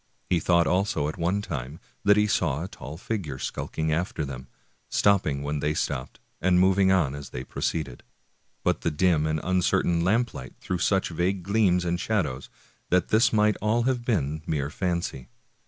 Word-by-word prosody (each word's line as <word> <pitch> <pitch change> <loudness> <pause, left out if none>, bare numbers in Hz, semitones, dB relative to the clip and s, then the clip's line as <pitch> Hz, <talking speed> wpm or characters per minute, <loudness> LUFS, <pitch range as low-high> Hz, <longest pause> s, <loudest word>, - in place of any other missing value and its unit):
He 90 - +4
thought 85 +1 +3
also 90 -5 +1
at - - -7
one 90 +5 0
time 70 -3 -5 0.2
that 105 0 +5
he 105 - +4
saw 75 -7 0
a - - -4
tall 70 -4 -9
figure 90 -9 -4
skulk - - -5
ing 80 0 +1
after 80 -2 -1
them, 65 -1 -7 0.4
stopping 80 -9 +2
when 75 +1 -2
they 75 +2 0
stopped 65 +2 -3 0.2
and 90 0 +4
moving 95 +1 +4
on 85 -8 +2
as 70 0 -7
they 60 - -6
proceeded; 70 -1 -3 0.6
but - - +1
the - - +1
dim 80 -1 +2
and 80 0 0
uncertain 90 -2 +2
lamplight 105 - -1
threw 90 -1 -3
such 95 +2 +1
vague 90 +3 -1
gleams 95 -3 +2
and 85 0 0
shadows 90 -11 -1 0.4
that 90 -1 +2
this 115 +2 +4
might 105 -1 +3
all 110 +3 +2
have 125 -1 0
been 80 - -1
mere 70 -2 -1
fancy. 85 -7 -3
85 Hz, 175 wpm, -26 LUFS, 75-100 Hz, 0.6 s, that